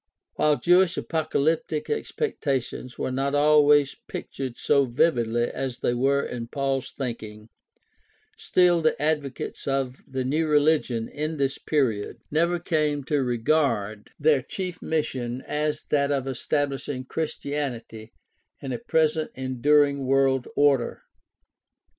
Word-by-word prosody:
While 150 -1 +3
Jewish 180 0 +4
apocalyptic 155 -1 -1
expectations 140 - -3
were - - -2
not 135 +2 -1
always 145 -1 +5
pictured 130 -3 -6
so 140 -2 +3
vividly 120 -3 +1
as 130 +1 -3
they 120 - +1
were 135 +3 +2
in 120 -1 -5
Paul's 135 0 -2
thinking, 110 -4 -6 0.9
still 175 -2 +3
the 155 - +1
advocates 150 -3 -2
of 135 -2 -1
the 130 -1 -3
new 155 +5 +1
religion 145 -6 +2
in 155 +2 -4
this 135 -1 -1
period 120 -9 0
never 170 +3 +2
came 155 -4 0
to 145 +1 0
regard 120 -4 0
their 145 -2 +4
chief 180 +4 -5
mission 130 -6 -2
as 150 0 -2
that 140 -1 +2
of 135 -2 0
establishing 135 0 -2
Christianity 135 -8 -4 0.5
in 135 - -6
a 120 - -3
present 155 -1 +1
enduring 140 +2 +2
world 135 -1 +2
order. 140 -4 +2
140 Hz, 120 wpm, -25 LUFS, 130-150 Hz, 0.9 s, always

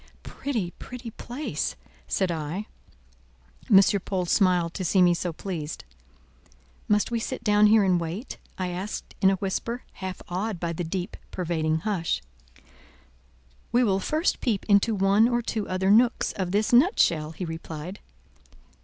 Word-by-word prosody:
"Pretty, 230 -11 -3
pretty 250 -2 -8
place!" 250 +7 -4 0.3
said 190 -2 0
I. 165 +5 -3 1.0
M. 195 - +9 0.2
Paul 185 -2 -1
smiled 175 -2 +2
to 190 - -4
see 185 +2 +2
me 175 -1 +6
so 175 0 -2
pleased. 160 -3 -5 1.0
"Must 210 +2 +2
we 235 - 0
sit - - -4
down 210 0 +5
here 215 0 +5
and 180 -3 +2
wait?" 175 +10 -5 0.2
I 185 -1 -2
asked 185 +4 -5
in 190 - +6
a 195 - +2
whisper, 205 +5 -3
half 185 -1 -6
awed 190 +2 -3
by 170 -1 -2
the 175 - -3
deep 180 +3 -4
pervading 160 -3 -1
hush. 170 - -1 1.5
"We 245 +1 +4
will 195 -4 +2
first 310 - 0
peep 220 -6 0
into 210 +2 +3
one 200 +3 +4
or 240 -1 0
two 220 -2 -3
other 190 +1 +1
nooks 235 +3 +4
of 185 -3 -3
this 210 +5 +1
nutshell," 170 - +4
he 180 - -5
replied. 165 +3 -7
190 Hz, 150 wpm, -26 LUFS, 175-215 Hz, 1.5 s, M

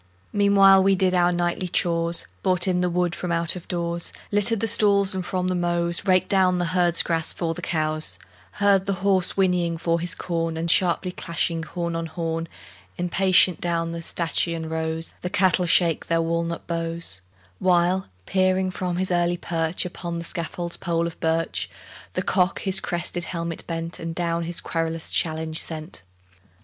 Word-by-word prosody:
Meanwhile 195 -1 +6
we 195 +1 +3
did 185 -1 +2
our 175 -1 +3
nightly 175 +1 -1
chores, 170 -1 +4 0.2
Brought 185 -1 +2
in 180 -1 +1
the 180 - +1
wood 175 0 0
from 180 -1 -4
out 170 0 +1
of 180 - -9
doors, 170 -1 -2 0.2
Littered 205 +2 +2
the 225 - 0
stalls, 200 -3 +3
and 190 -1 -3
from 180 0 -2
the 185 - 0
mows 175 +1 0
Raked 185 -1 +3
down 185 -2 +3
the 175 - 0
herd's 175 -2 +4
grass 165 -1 -1
for 165 -2 -2
the - - -8
cows: 155 -1 0 0.4
Heard 200 - +2
the 190 -1 -2
horse 190 -2 +2
whinnying 180 -3 +1
for 165 0 0
his 175 +1 -1
corn; 165 -2 -2
And, 165 +1 +1
sharply 180 0 +2
clashing 170 -1 -2
horn 170 +1 -4
on 165 0 -3
horn, 165 0 -3 0.5
Impatient 185 0 +3
down 165 -1 -1
the 170 0 -5
stanchion 165 -1 -1
rows 160 0 -3
The 180 - -3
cattle 180 -1 +2
shake 165 -1 +2
their 165 0 +1
walnut 170 0 -2
bows; 165 - +1 0.4
While, 180 +1 +2 0.2
peering 185 0 +1
from 180 -1 -3
his 185 0 -1
early 175 0 +1
perch 165 0 -1
Upon 175 -1 -5
the 170 - -5
scaffold's 170 +1 -4
pole 170 -2 -1
of 170 - -6
birch, 165 -1 -1 0.4
The - - -2
cock 185 -1 +1
his 190 -1 +1
crested 175 -1 -3
helmet 170 -2 -4
bent 165 0 -4
And 165 0 -5
down 170 -1 -1
his 170 +1 -2
querulous 165 -1 -3
challenge 160 -1 0
sent. 155 - -4
175 Hz, 175 wpm, -24 LUFS, 165-185 Hz, 0.5 s, Meanwhile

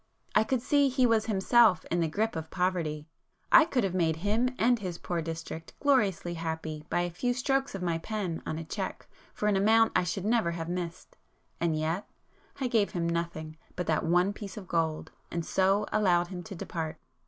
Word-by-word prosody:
I - - +5
could 245 +1 -1
see 285 0 +3
he 255 0 +2
was 225 -2 +2
himself 215 -1 +4
in 175 - +2
the 165 - +2
grip 215 +7 -1
of 160 0 -5
poverty,—I 170 - +1
could 265 -8 0
have 190 -2 -1
made 165 -3 +2
him 210 +8 +1
and 240 +1 +3
his 180 -4 -4
poor 175 -1 -3
district 165 0 -6
gloriously 210 - +2
happy 160 -2 -4
by 175 - +1
a 175 0 -2
few 245 +8 -1
strokes 270 -1 0
of 190 - -4
my 170 -2 0
pen 190 -3 -3
on 155 - -4
a 165 - -4
cheque 155 - -5 0.3
for - - -3
an 210 - +3
amount 220 +3 +4
I - - +4
should 180 +2 -3
never 225 -5 +2
have 165 0 -5
missed,—and 170 -2 -5
yet—I 170 - -5
gave 225 -4 +1
him 170 -2 -1
nothing 165 -2 -3 0.2
but 180 - -2
that 155 - +1
one 180 +4 +3
piece 205 -1 -8
of 195 -3 -8
gold, 160 -3 -1 0.2
and 170 -1 -3
so 195 +2 +2
allowed 175 -4 +2
him 180 -2 -6
to 205 - -7
depart. 165 -2 -4
180 Hz, 190 wpm, -29 LUFS, 165-215 Hz, 0.3 s, I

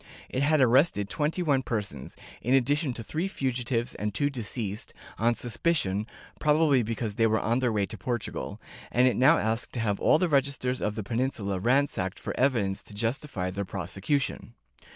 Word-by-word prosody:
It 130 - -1
had 150 +1 +3
arrested 125 - +4
twenty 155 +4 0
one 140 -5 +2
persons, 105 - -4 0.3
in 125 +3 +2
addi 135 +2 +3
tion 150 -3 -1
to 115 - -5
three 160 - -2
fugitives 125 -6 -1
and 105 0 -3
two 145 +4 +2
deceased, 110 -4 -4 0.2
on 115 +2 +3
suspicion 115 - -1 0.2
— - - -22
probably 150 -3 +4
because 115 -1 -3
they 115 +1 +3
were 110 0 +2
on 115 +3 +1
their 125 -2 +1
way 105 -2 +1
to 110 +1 -9
Portugal 120 +2 -4 0.2
— - - -17
and 125 +1 +4
it 125 - +2
now 140 +6 +6
asked 110 +2 -1
to 125 - -3
have 105 -3 0
all - - +5
the 180 - +1
registers 135 -3 0
of 105 0 -1
the 110 - -3
Peninsula 105 -3 -1
ransacked 120 -5 +1
for - - -5
evidence 115 -8 +1
to 105 - -12
justify 115 -4 -2
their 100 +2 -3
prosecution. 100 - -2
120 Hz, 190 wpm, -28 LUFS, 105-140 Hz, 0.3 s, now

